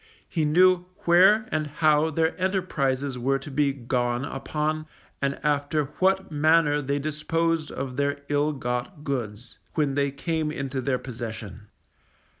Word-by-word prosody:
He 160 -3 0
knew 180 +3 +4 0.2
where 190 +6 +6
and 155 -1 0
how 155 +1 +3
their 160 +1 0
enterprises 140 -9 0
were 135 +3 +1
to 135 +2 -9
be 140 +1 +2
gone 125 -1 -1
upon, 155 +3 -2 0.3
and 140 0 -1
after 150 +1 +1
what 190 -1 +2
manner 150 0 +3
they 140 +1 -1
disposed 155 +2 -1
of 130 -1 -5
their 140 0 0
ill 145 +1 +1
got 130 +4 -4
goods, 120 -5 -5 0.2
when 150 -3 +1
they 140 0 +1
came 155 +2 -2
into 135 -3 -3
their 130 0 0
possession. 110 -5 -7
145 Hz, 140 wpm, -26 LUFS, 135-160 Hz, 0.3 s, where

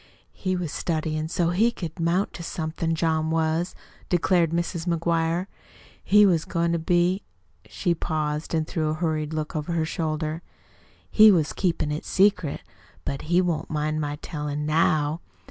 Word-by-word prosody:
"He 185 -1 -2
was 175 -4 -3
studyin' 155 -1 -2
so 170 0 +1
he 215 +7 +3
could 170 -5 -7
'mount 170 +4 +1
to - - -8
somethin' 165 -1 -2
John 160 -1 +1
was," 160 +2 0 0.3
declared 175 -1 +3
Mrs. 170 0 -2
McGuire. 170 +1 +1 0.6
"He 210 +1 +6
was 170 -5 +3
goin' 170 -1 0
to 170 - 0
be" 175 +3 +2 0.5
she 175 - 0
paused 155 -1 -2
and 160 -1 0
threw 155 -2 -1
a 155 - -1
hurried 155 -2 -1
look 155 0 -3
over 155 +3 -2
her 165 -1 +1
shoulder 155 -1 -2 0.7
"he 215 0 +8
was 160 -5 +2
keepin' 170 -5 0
it 150 - -3
secret, 185 -6 +2 0.4
but 140 - -3
he 175 +1 +4
won't 170 -3 -2
mind 155 0 -1
my 145 -1 -2
tellin' 150 -2 -3
NOW. 155 0 +2
165 Hz, 160 wpm, -25 LUFS, 155-175 Hz, 0.7 s, he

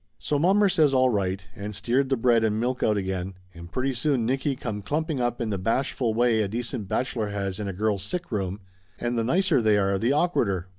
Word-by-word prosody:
So 115 - -1
mommer 195 +6 +4
says 155 -7 +3
all 130 -1 +4
right, 95 -2 -1
and 105 -1 -6
steered 130 +6 0
the 135 - +1
bread 115 -1 +3
and 110 -1 +1
milk 125 +2 -1
out 105 -1 +2
again 95 -1 -3 0.2
and 85 0 -11
pretty 130 +1 -1
soon 125 -1 +1
Nicky 135 +3 0
come 110 -5 -5
clumping 155 +5 -2
up 120 -1 -1
in 115 -3 -2
the 100 - -2
bashful 115 +2 0
way 115 -1 +3
a 105 - 0
decent 115 0 -4
bachelor 115 -2 -1
has 100 -1 -3
in 105 - -3
a - - -2
girl's 105 +1 0
sick 170 - -4
room, 100 -1 -2 0.4
and 120 0 -2
the 115 - +1
nicer 170 +2 +2
they 110 -2 +3
are 100 -1 +1
the 115 - +1
awkwarder. 120 - +1
115 Hz, 225 wpm, -25 LUFS, 100-130 Hz, 0.4 s, mommer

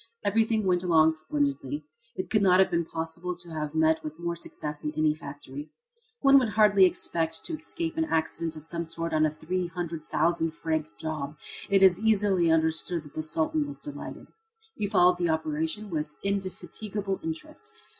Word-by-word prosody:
Everything 220 +1 +2
went 180 -1 +3
along 160 -3 +5
splendidly. 145 -2 -2 0.3
It 185 - -5
could 215 - +3
not 185 -2 +5
have 190 - +4
been 170 -1 +1
possible 165 +3 -4
to 170 -1 -11
have 155 -1 -4
met 160 0 +3
with 155 0 -6
more 170 0 -2
success 150 -3 -6
in 150 - -1
any 155 -1 +3
factory. 145 -1 -9 0.5
One 275 0 +7
would 245 -4 0
hardly 210 -3 +6
expect 165 -2 -1
to 335 - -3
escape 325 +1 -4
an 320 - +2
accident 160 - -1
of 155 0 -9
some 170 +1 -3
sort 165 0 -4
on 155 0 +4
a - - -3
three 175 +4 -2
hundred 170 -2 -4
thousand 165 +1 0
franc 160 -2 -1
job. 155 -1 -4 0.3
It 195 -1 +5
is 185 -1 +6
easily 205 -5 +3
understood 160 +1 +2
that 145 -2 -14
the 155 - -2
Sultan 160 - 0
was 290 - -7
delighted. 295 - -8 0.5
He 205 - -2
followed 180 -3 +5
the 175 -1 +1
operation 160 +6 -1
with 150 -2 -3
indefatigable 195 +1 -3
interest. 310 - -6
170 Hz, 175 wpm, -28 LUFS, 155-195 Hz, 0.5 s, One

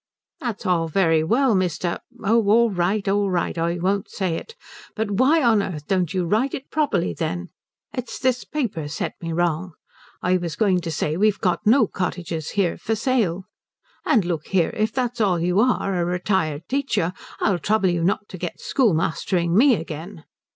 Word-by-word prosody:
"That's 235 -5 -4
all 170 -3 +2
very 165 -2 +2
well, 240 +8 +3
Mr. 180 -2 0 0.2
oh 225 +3 +3
all 230 +2 +5
right, 195 +3 0
all 200 0 +2
right, 180 -2 -1
I 170 +1 -1
won't 190 +3 -1
say 185 -4 -2
it. 455 - -8 0.4
But 220 -2 -2
why 270 +10 +3
on 225 -4 +4
earth 155 -7 -5
don't 185 -3 0
you 185 -2 0
write 220 +10 +1
it 265 - -9
properly, 215 - 0
then? 85 +1 -3 0.4
It's 250 -2 -5
this 255 -1 0
paper's 170 - -3
set - - -3
me 165 -1 -4
wrong. 170 +1 -1 0.5
I 180 +1 +3
was 170 -3 -4
going 185 -2 +2
to 170 - -4
say 155 0 -1
we've 210 +1 +3
got 180 +2 -1
no 235 +2 +6
cottages 175 -4 -4
here 185 -4 +1
for 225 - -1
sale. 220 -7 0 0.6
And 210 -6 +3
look 165 -4 -3
here, 180 -4 +1
if 215 0 0
that's 245 -2 -2
all 185 -5 +2
you 180 +3 +1
are, 230 -4 +2
a 175 -2 0
retired 175 -3 -1
teacher, 260 -10 0 0.3
I'll 190 -4 +1
trouble 210 0 +2
you 175 -1 0
not 195 +3 0
to 185 - -8
get 175 -1 -5
schoolmastering 175 - +1
me 255 +4 +6
again." 165 +1 -7
185 Hz, 180 wpm, -23 LUFS, 170-220 Hz, 0.6 s, no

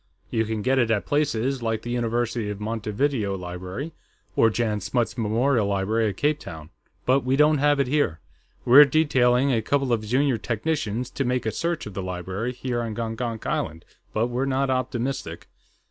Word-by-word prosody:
You 110 0 +1
can 110 -1 -3
get 130 +1 +2
it 120 -3 +2
at 105 -3 +1
places 135 -3 0
like 115 -1 -2
the 120 - -4
University 120 -2 -1
of 105 -1 -5
Montevideo 110 0 -1
Library, 90 - -6 0.4
or 115 - +5
Jan 110 -2 -1
Smuts 115 +4 -1
Memorial 115 0 +1
Library 105 +3 +1
at 95 - -6
Cape 150 +1 +1
Town. 80 - -9 0.3
But 130 +2 +4
we 130 0 0
don't 150 +1 +4
have 145 0 +3
it 140 - +3
here. 130 - 0 0.5
We're 130 +4 +10
detailing 135 -3 +3
a 115 - +2
couple 135 +2 +1
of 110 -2 0
junior 125 +2 +1
technicians 120 0 -2
to 135 - -2
make 125 -2 -1
a 110 - 0
search 170 +4 -2
of 105 - -8
the 95 - -4
library 95 +5 -3
here 125 -1 -3
on 115 -2 -4
Gongonk 115 0 -4
Island, 80 +1 -2 0.3
but 110 +2 +1
we're 125 +2 -1
not 135 0 0
optimistic. 130 -8 -2
120 Hz, 180 wpm, -24 LUFS, 105-135 Hz, 0.5 s, We're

